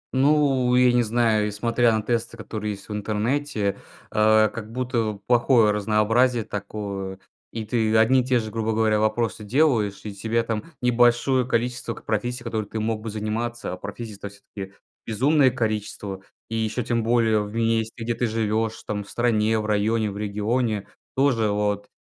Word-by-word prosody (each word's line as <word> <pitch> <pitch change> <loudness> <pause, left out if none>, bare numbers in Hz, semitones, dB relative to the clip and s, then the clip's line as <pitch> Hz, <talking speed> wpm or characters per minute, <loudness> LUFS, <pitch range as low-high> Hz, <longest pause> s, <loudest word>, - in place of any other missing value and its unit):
Ну, 135 -2 +3
я 125 -1 +5
не 120 - +4
знаю, 110 -2 +2
несмотря 115 +3 +1
на 110 -1 0
тесты 115 0 -2
которые 105 -2 -4
есть 100 -1 -12
в 105 - -5
интернете, 110 +1 -1 0.3
а, 110 0 +5
как 110 0 -8
будто 115 -4 -1
плохое 120 -2 +4
разнообразие 110 +4 +2
такое. 100 -2 -5 0.3
И 115 -1 -5
ты 110 0 +1
одни 125 +4 +5
и - - -3
те 125 0 +2
же, 110 -1 -5
грубо 110 0 -1
говоря, 110 -1 +2
вопросы 110 0 0
делаешь, 110 -4 +1
и 105 - -6
тебе 115 +4 -1
там 115 -2 -3 0.2
небольшое 125 +1 +3
количество 120 -1 -1
к - - -14
профессий, 120 +3 -2
которыми 110 -3 -3
ты 110 - -4
мог 110 0 -1
бы 110 - -5
заниматься. 110 +1 -3
А - - -6
профессий-то 100 +1 -7
всё-таки 100 -1 -10 0.3
безумное 135 +5 +3
количество, 105 -4 -3 0.3
и 115 - -5
еще 110 +2 -1
тем 115 0 0
более 115 -2 +3
в 105 0 -6
месте, 115 0 0
где 120 +1 -1
ты 120 +1 -1
живешь 110 0 -1
там 105 -1 -3
в 100 - -16
стране, 110 -2 +1
в 105 - -3
районе, 105 +1 +1
в 100 - -8
регионе. 105 +1 -1 0.3
Тоже 125 -6 +2
вот, 105 0 -1
110 Hz, 170 wpm, -24 LUFS, 105-120 Hz, 0.3 s, я